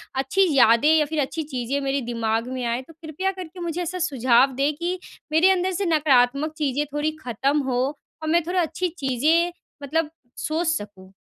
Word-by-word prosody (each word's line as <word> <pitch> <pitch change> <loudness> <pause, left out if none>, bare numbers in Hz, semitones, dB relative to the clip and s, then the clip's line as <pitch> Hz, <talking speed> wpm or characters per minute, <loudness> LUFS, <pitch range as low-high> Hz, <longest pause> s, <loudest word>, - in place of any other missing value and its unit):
अच्छी 275 +9 +2
यादें 235 +4 +5
या 305 - +3
फिर 310 +1 -3
अच्छी 315 +4 -3
चीज़ें 255 +3 -1
मेरे 275 0 -1
दिमाग 225 0 -1
में 255 - -3
आएँ, 235 +2 -1
तो 325 - -16
कृपया 325 +4 -3
करके 365 -1 -9
मुझे 345 0 -3
ऐसा 360 +2 -4
सुझाव 260 0 +3
दें 280 +3 +1
कि 350 +2 -2 0.3
मेरे 325 +4 +5
अंदर 370 0 +1
से 395 +3 -1
नकारात्मक 295 -2 +3
चीज़ें 290 -1 0
थोड़ी 295 +1 0
ख़त्म 270 +4 0
हो 245 -1 0 0.4
और 315 - -3
मैं 340 +1 +3
थोड़ा 360 +1 +1
अच्छी 335 +2 -1
चीज़ें 310 +6 +2 0.3
मतलब 305 +2 0 0.3
सोच 320 +2 -2
सकूँ? 205 - -4
300 Hz, 180 wpm, -23 LUFS, 260-335 Hz, 0.4 s, यादें